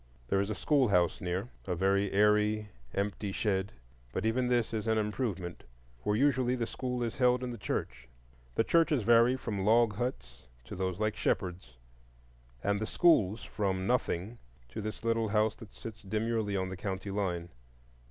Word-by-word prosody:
There 95 - +3
is 100 - -2
a 110 - -2
schoolhouse 100 - +2
near,—a 90 +1 -3
very 95 +2 +2
airy, 105 +1 +3 0.3
empty 100 0 -2
shed; 95 -1 0 0.4
but 95 - -2
even 125 +3 +1
this 120 -2 +1
is 110 0 -2
an 110 0 +2
improvement, 105 -5 -2 0.4
for 105 +10 0
usually 130 0 +2
the 120 -2 -1
school 125 +1 -3
is 115 - -3
held 125 -1 +3
in 125 - -3
the 120 - -6
church. 65 -8 -3 0.5
The - - +3
churches 155 -4 +3
vary 120 +3 +5
from 105 -6 -3
log 110 +1 +4
huts 65 - -4 0.2
to - - -7
those 95 0 -2
like 110 0 0
Shepherd's, 90 -9 -2 0.9
and 100 0 +1
the 110 - -2
schools 110 - +3
from 95 -3 -2
nothing 115 -2 -1 0.3
to 65 - -5
this 110 +2 -5
little 115 -1 +1
house 105 +1 +2
that 110 - -12
sits 110 -1 -9
demurely 110 0 -1
on 95 0 -1
the 95 - -6
county 95 +1 -4
line. 90 -4 -2
105 Hz, 165 wpm, -31 LUFS, 95-115 Hz, 0.9 s, vary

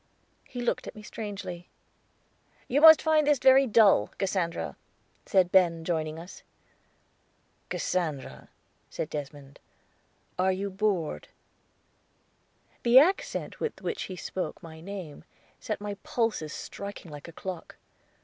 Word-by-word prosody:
He 245 - -7
looked 240 - -1
at - - -8
me 215 - -11
strangely. 195 -5 -7 1.0
"You 280 +4 +1
must 320 0 +9
find 310 -2 +3
this 295 -1 +5
very 265 +1 +6
dull, 210 - +5
Cassandra," 170 - -2 0.5
said 185 -2 +3
Ben, 170 -3 +3
joining 160 -2 -2
us. 170 +3 -10 1.3
"Cassandra," 155 -7 -3 0.4
said 155 - -5
Desmond, 145 -1 -7 0.8
"are 190 +1 +3
you 195 +1 -3
bored?" 185 - -1 1.5
The 240 +1 +5
accent 350 +8 +3
with 460 - -3
which 440 - -3
he 185 - -5
spoke 185 +1 -5
my 160 -1 -10
name 180 -5 -8 0.4
set 215 - -4
my 205 0 -4
pulses 225 -10 -1
striking 200 -3 -8
like 145 +1 -9
a - - -9
clock. 180 0 -7
190 Hz, 120 wpm, -28 LUFS, 165-225 Hz, 1.5 s, must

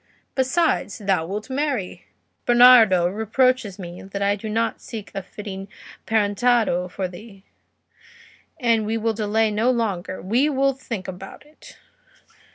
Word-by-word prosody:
Besides, 265 -2 0
thou 195 -6 0
wilt 210 +4 -5
marry; 265 -8 -3 0.4
Bernardo 240 -7 +7
reproaches 220 +2 0
me 175 -2 -8
that 200 +1 -5
I 200 0 +2
do 215 +2 -7
not 225 +2 -1
seek 220 -3 -8
a 195 - -3
fitting 195 0 -8 0.4
parentado 210 -3 +1
for 185 +1 -3
thee, 195 +2 -13 1.2
and 230 -4 +2
we 225 +1 -1
will 225 0 0
delay 215 0 +1
no 220 +4 +1
longer, 200 -7 -2
we 240 +10 +1
will 275 -1 +1
think 230 -7 -6
about 190 +8 -9
it." 300 +1 -17
215 Hz, 135 wpm, -22 LUFS, 195-245 Hz, 1.2 s, Bernardo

